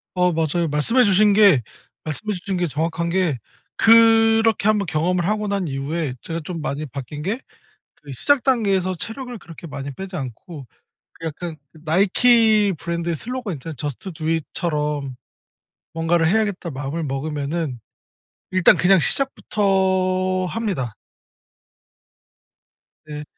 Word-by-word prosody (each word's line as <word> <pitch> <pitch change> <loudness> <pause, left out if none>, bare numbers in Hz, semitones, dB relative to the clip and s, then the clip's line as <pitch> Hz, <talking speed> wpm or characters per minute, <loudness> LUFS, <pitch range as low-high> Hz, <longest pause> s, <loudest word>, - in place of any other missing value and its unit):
어 180 -1 +2
맞아요. 165 +1 0
말씀해 190 - +3
주신 205 +1 +4
게 200 - +6 0.4
말씀해 160 +8 -3
주신 185 +1 -4
게 175 -1 0
정확한 165 +3 -2
게 175 -6 +1 0.4
그렇게 225 -1 +5
한번 210 -2 +2
경험을 175 +2 0
하고 210 +2 -1
난 200 -3 -1
이후에 140 +1 -3
제가 165 0 -4
좀 170 -1 -5
많이 150 +1 -3
바뀐 140 +1 -7
게 200 +10 -2 0.7
그 145 - -10
시작 275 - +2
단계에서 195 -7 +1
체력을 245 +5 -6
그렇게 170 -2 -11
많이 140 -1 -6
빼지 190 +4 -7
않고 135 +2 -8 0.5
그 165 - -8
약간 160 +1 -5 0.2
나이키 205 +6 +3
브랜드의 170 0 -3
슬로건 245 - -4
있잖아요. 155 +2 -7
"저스트 145 +7 -6
두 155 0 -3
잇." 165 -2 0
처럼 150 -5 -2 0.8
'뭔가를 165 0 +1
해야겠다.' 200 -2 0
마음을 145 +3 -4
먹으면은 145 0 -3 0.7
일단 185 -1 +5
그냥 190 0 +5
시작부터 190 - +1
합니다. 180 - -3 2.1
네. 150 -1 -7
175 Hz, 285 characters per minute, -21 LUFS, 150-200 Hz, 2.1 s, 게